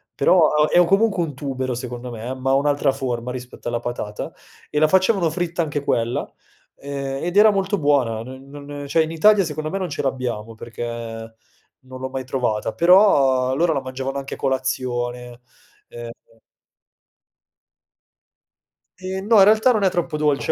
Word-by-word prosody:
però 175 -4 +4
ha 150 0 +2
è - - +4
o 175 - +6
comunque 195 +1 +2
un 150 -4 -5
tubero 130 -2 -3
secondo 125 0 -6
me, 115 +3 -5
ma 130 0 -2
ha 135 - +4
un'altra 145 0 +2
forma 125 -2 -3
rispetto 125 -1 -8
alla 120 0 -1
patata 115 -4 -5 0.4
e 150 - -1
la 155 - +5
facevano 190 0 +3
fritta 170 +1 -2
anche 145 -2 -3
quella, 115 -2 0 0.5
ehm, 140 -1 -5
ed 175 +1 -3
era 215 +1 +7
molto 195 0 0
buona. 135 - +1
Non 130 +2 -11
non 145 0 -8
cioè, 160 +3 +3
in 160 - -5
Italia 200 +4 +4
secondo 155 -1 -4
me 195 - -3
non 185 -2 -3
ce - - -3
l'abbiamo 120 -5 -3
perché 115 +1 -8 1.0
non 130 0 -12
l'ho 130 - -4
mai 130 0 -4
trovata, 120 -4 -2
però 140 -9 +4
loro 165 +2 +2
la 140 - -1
mangiavano 130 +1 -5
anche 135 0 -5
a - - -15
colazione, 125 -2 -3 0.5
ehm 120 0 -8 2.9
Ehm, 190 +1 -5
no. 225 -1 +5
In 195 - +9
realtà 220 +4 +5
non 215 -4 +1
è 190 - +4
troppo 175 -3 -2
dolce 150 -2 +1
140 Hz, 170 wpm, -21 LUFS, 125-170 Hz, 2.9 s, In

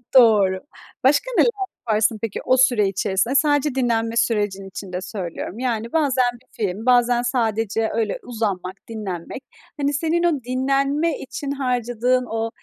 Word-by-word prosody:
Doğru. 205 -6 +6 0.4
Başka 290 - +3
neler - - +6 0.4
yaparsın 215 0 +2
peki, 225 -3 -3
o 255 0 +4
süre 245 -5 +4
içerisinde? 195 +5 0
Sadece 290 -1 +2
dinlenme 230 -2 0
sürecin 205 -4 0
içinde 185 -1 -6
söylüyorum. 185 +1 -6
Yani, 235 -2 -2
bazen 265 -6 +2
bir 245 +1 -18
film, 205 +2 -3
bazen 245 -1 +4
sadece 225 -3 0
öyle 220 -3 -1
uzanmak, 200 -6 -3
dinlenmek, 210 +2 -6 0.4
hani, 285 +1 +1
senin 325 +4 0
o 305 -7 +1
dinlenme 275 +5 0
için 280 +1 -5
harcadığın 250 -2 0
o, 225 0 -2
235 Hz, 140 wpm, -22 LUFS, 210-260 Hz, 0.4 s, Doğru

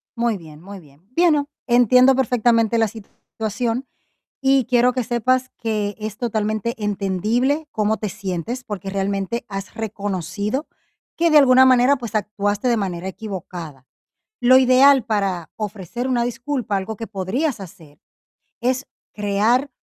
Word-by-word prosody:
Muy 235 -2 0
bien, 155 -3 -13
muy 200 +2 -10
bien. 145 -3 -20
Bueno, 305 -4 +3 0.2
entiendo 250 +2 +5
perfectamente 235 -3 +2
la 225 -1 +3
situación 225 +3 -5 0.5
y 270 -1 +3
quiero 245 +1 +3
que 255 0 -2
sepas 255 +2 0
que 210 -3 -2
es 215 0 -5
totalmente 220 -1 -1
entendible 215 - 0
cómo 215 0 0
te 210 - -3
sientes, 195 +6 -4
porque 200 -3 -6
realmente 195 +3 -2
has 195 -1 -7
reconocido 205 - -3 0.5
que 335 0 +2
de 310 - +6
alguna 260 -2 +7
manera, 255 +2 +5
pues 235 -3 -7
actuaste 205 +1 -1
de 240 -1 +2
manera 185 -3 -3
equivocada. 180 -8 -7 0.6
Lo 255 +2 +6
ideal 260 +1 +5
para 195 -6 -1
ofrecer 215 +2 -5
una 250 -2 +1
disculpa, 245 -3 -2
algo 200 +3 -4
que 225 +2 -7
podrías 215 - -2
hacer, 160 -5 -13 0.6
es 255 +2 -1 0.3
crear 215 +6 +1
220 Hz, 135 wpm, -21 LUFS, 200-250 Hz, 0.6 s, alguna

